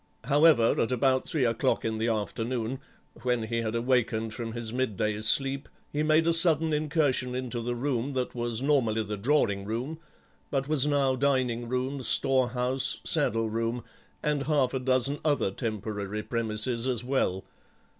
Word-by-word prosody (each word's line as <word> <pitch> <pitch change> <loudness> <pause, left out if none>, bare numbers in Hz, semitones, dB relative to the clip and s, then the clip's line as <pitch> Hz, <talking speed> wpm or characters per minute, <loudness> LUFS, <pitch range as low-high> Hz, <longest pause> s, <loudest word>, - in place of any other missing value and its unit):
However, 145 -2 +4
at 115 - 0
about 130 +1 +1
three 145 -6 0
o'clock 115 -1 0
in 110 -1 -2
the 115 - 0
afternoon, 115 +3 -2 0.4
when 125 -2 0
he 115 +1 -2
had 110 0 -3
awakened 115 -2 0
from 115 -1 -5
his 115 -1 -5
midday 110 -4 -1
sleep, 135 +5 +2 0.2
he 145 - 0
made 155 +1 +3
a 170 - +3
sudden 165 -2 +5
incursion 145 -4 0
into 125 -2 -3
the 120 +1 -3
room 130 +1 -2
that 130 -1 -2
was 120 0 -3
normally 120 -7 +2
the 105 0 -4
drawing 105 -3 +1
room, 120 +10 -4 0.5
but 135 -1 -1
was 150 -2 +2
now 140 -3 +2
dining 125 -3 0
room, 130 +2 -2
store 130 0 +3
house, 125 +2 -1
saddle 115 +1 0
room, 115 +2 -2 0.4
and 145 -2 -1
half 140 -5 +2
a 130 - -1
dozen 130 +2 +1
other 145 -10 +1
temporary 105 -1 -4
premises 115 +2 -1
as 125 -3 -1
well. 110 -8 -1
125 Hz, 160 wpm, -28 LUFS, 115-135 Hz, 0.5 s, sudden